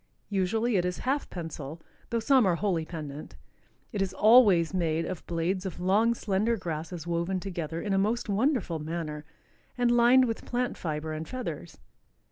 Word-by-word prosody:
Usually 210 +4 +1
it 180 - +2
is 180 0 -2
half 275 +3 0
pensile, 160 -3 -6 0.3
though 235 - 0
some 250 -1 +4
are 175 - +3
wholly 170 -4 0
pendent. 150 -3 -7 0.6
It 205 -5 -2
is 195 -1 -1
always 205 -7 +6
made 165 -3 0
of 185 - -5
blades 175 +3 -1
of 190 -4 -6
long, 210 +6 +3
slender 215 +2 0
grasses 165 -2 -5
woven 170 +2 -1
together 170 -4 -4
in 200 +2 -2
a 195 - +3
most 220 +5 0
wonderful 210 - 0
manner 155 -1 -5 0.5
and 245 -1 +3
lined 240 +2 +6
with 225 -2 -3
plant 245 0 -1
fiber 155 -1 -4
and 155 +1 -5
feathers. 170 - -6
185 Hz, 165 wpm, -28 LUFS, 165-225 Hz, 0.6 s, always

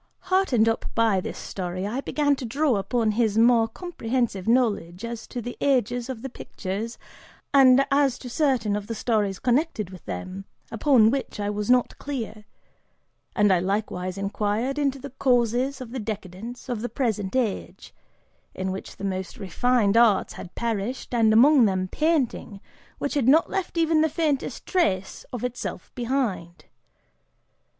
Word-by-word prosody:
Heartened 260 - +3
up 225 - 0
by 220 -5 +3
this - - -6
story, 185 0 -4
I 240 +7 -2
began 290 0 +1
to - - -6
draw 270 +1 +1
upon 215 +3 0
his 220 -1 +1
more 230 0 +5
comprehensive 240 - -3
knowledge 220 -6 +1
as 235 -1 -6
to 245 - -6
the 245 - -5
ages 245 -2 +1
of 240 -4 -6
the - - -3
pictures 215 +1 -5 0.6
and 270 -1 +7
as 275 -2 +3
to 255 - -9
certain 245 -6 +1
of 205 -1 -4
the 230 - -4
stories 210 -4 0
connected 245 - 0
with 185 -3 -11
them, 185 - -6 0.3
upon 225 -2 +4
which 270 -5 -3
I 205 0 -1
was 210 +1 -3
not 250 -1 +2
clear; 230 -6 -5 0.9
and 205 -2 +4
I 180 - +3
likewise 185 -1 -2
inquired 210 +7 -1
into 275 -2 +1
the 275 0 -9
causes 250 +1 +1
of 240 -2 -8
the 260 - -4
decadence 215 +2 -6
of 240 -4 -3
the 245 - -3
present 215 -6 -2
age, 235 -6 -2 0.6
in 190 0 -2
which 190 - -7
the 200 - -5
most 190 +4 -4
refined 220 +2 +1
arts 225 -5 +4
had 175 - -10
perished, 235 +3 -3
and 225 -2 +4
among 255 +3 +6
them 185 -2 0
painting, 275 - -1 0.4
which 285 - -2
had 275 -5 +1
not 310 +5 +5
left 380 -3 -3
even 325 -1 +3
the 315 - +3
faintest 300 -3 -1
trace 195 - -1
of 245 -2 -5
itself 250 0 -5
behind. 235 -9 -2
235 Hz, 160 wpm, -25 LUFS, 205-265 Hz, 0.9 s, and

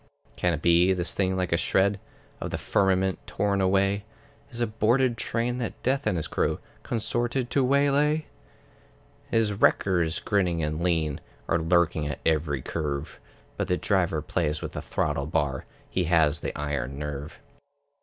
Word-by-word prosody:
Can 90 -1 +1
it 70 - -9
be, 85 +2 +5
this 90 -1 -2
thing 95 -1 0
like 90 -1 -1
a - - +4
shred 100 +3 +2 0.4
Of - - -4
the - - -3
firmament 95 -1 +1
torn 100 0 0
away, 95 +1 +2 0.5
Is 120 -3 -8
a 120 - +2
boarded 115 +3 +2
train 120 +2 -1
that 120 - -5
Death 135 +2 +1
and 90 - +1
his 80 - -2
crew - - 0 0.2
Consorted 120 +2 -1
to 140 - +3
waylay? 145 +3 +2 1.0
His 110 -2 +2
wreckers, 90 -5 +2
grinning 90 -5 0
and 75 +1 -2
lean, 80 -5 0 0.3
Are 85 - +2
lurking 80 -2 +2
at 75 - -3
every 75 -4 +1
curve; 75 -2 -4 0.4
But - - -1
the 90 - +1
Driver 85 -7 +1
plays 75 -3 -1
with - - -5
the - - -5
throttle 70 - -1
bar; 70 -3 -1 0.2
He 90 - -1
has 80 -3 +3
the - - -5
iron 75 -2 -3
nerve. 75 0 -6
90 Hz, 160 wpm, -26 LUFS, 80-110 Hz, 1.0 s, be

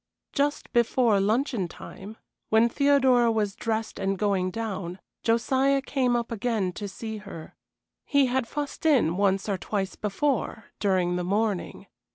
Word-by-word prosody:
Just 290 0 -1
before 235 -3 +3
luncheon 220 - +1
time, 200 +5 -10 0.3
when 220 +2 +5
Theodora 260 -3 +4
was 210 -3 0
dressed 225 -1 -3
and 195 0 0
going 195 -2 +1
down, 190 -4 -4 0.2
Josiah 265 +4 +2
came 260 -3 0
up 235 -1 -2
again 220 -4 -1
to 205 +3 -5
see 220 +3 -6
her. 200 -6 -10 0.5
He 280 -2 +3
had 255 -1 0
fussed 290 +2 -5
in 240 - +3
once 195 0 +1
or 195 -3 -1
twice 195 -1 -3
before 220 +1 -2
during 185 -3 +1
the 180 - -2
morning. 205 +1 -1
220 Hz, 145 wpm, -26 LUFS, 195-245 Hz, 0.5 s, when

